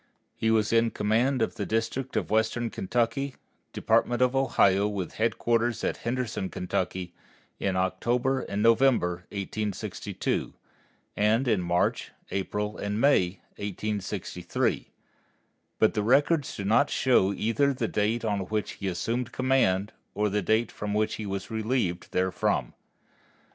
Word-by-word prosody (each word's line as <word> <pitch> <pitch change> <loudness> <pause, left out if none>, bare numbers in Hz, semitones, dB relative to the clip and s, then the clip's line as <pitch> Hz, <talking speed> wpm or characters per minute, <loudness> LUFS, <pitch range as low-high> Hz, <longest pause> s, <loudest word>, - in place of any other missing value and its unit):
He 110 - 0
was 110 0 +2
in 115 0 +4
command 115 +5 +1
of - - -1
the - - -2
District 115 +4 -2
of - - -1
Western 110 +2 +1
Kentucky, 120 +6 -1 0.4
Department 120 0 +1
of 125 +1 +3
Ohio, 105 -7 +3
with 100 -4 -4
headquarters 115 +1 +1
at - - -1
Henderson, 115 -5 -2
Kentucky, 90 0 -3 0.5
in 95 -1 0
October 120 +8 +1
and 100 -4 -3
November, 115 -8 +3
1862, 105 0 -3 0.6
and 110 +5 +2
in 110 -6 +2
March, 90 0 0 0.2
April, 105 +2 -2
and 105 +1 -2
May, 100 -10 +3 0.2
1863, 100 0 -2 0.9
but 110 - +3
the 105 - 0
records 145 +6 +2
do 100 - -4
not 115 +8 +4
show 120 -7 +3
either 115 +8 +1
the 125 -4 -2
date 110 +3 0
on 105 -2 0
which 105 0 -2
he 100 - -5
assumed 115 +7 -2
command 125 -7 +2 0.2
or 105 0 +1
the 105 +1 +1
date 110 +5 +1
on 105 0 -1
which 110 0 0
he 105 - -4
was 100 +2 -4
relieved 110 -5 -1
therefrom. 95 0 0
110 Hz, 135 wpm, -27 LUFS, 100-120 Hz, 0.9 s, in